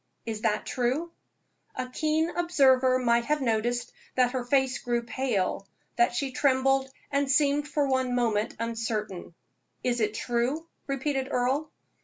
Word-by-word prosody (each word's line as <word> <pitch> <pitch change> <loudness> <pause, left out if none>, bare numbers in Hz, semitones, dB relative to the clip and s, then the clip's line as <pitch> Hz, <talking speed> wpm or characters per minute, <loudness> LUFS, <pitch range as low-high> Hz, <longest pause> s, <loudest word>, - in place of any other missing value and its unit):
Is 220 -2 -4
that 215 -1 0
true?" 260 +7 -1 0.6
A 255 - -2
keen 310 +5 0
observer 265 -7 +4
might 235 -2 +2
have 300 0 +1
noticed 240 -1 0 0.2
that 250 -1 +3
her 255 -1 -2
face 265 +1 +1
grew 240 -1 -1
pale 230 -6 -1 0.3
that 240 0 +3
she 275 +1 -1
trembled 270 0 +2 0.2
and 280 -1 +1
seemed 290 +1 +3
for 295 0 +1
one 260 -2 +1
moment 225 -3 0
uncertain. 220 -6 -3 0.5
"Is 240 -2 0
it 215 0 0
true?" 245 +8 -1 0.2
repeated 275 -1 -1
Earle. 265 +4 0
255 Hz, 140 wpm, -28 LUFS, 235-275 Hz, 0.6 s, observer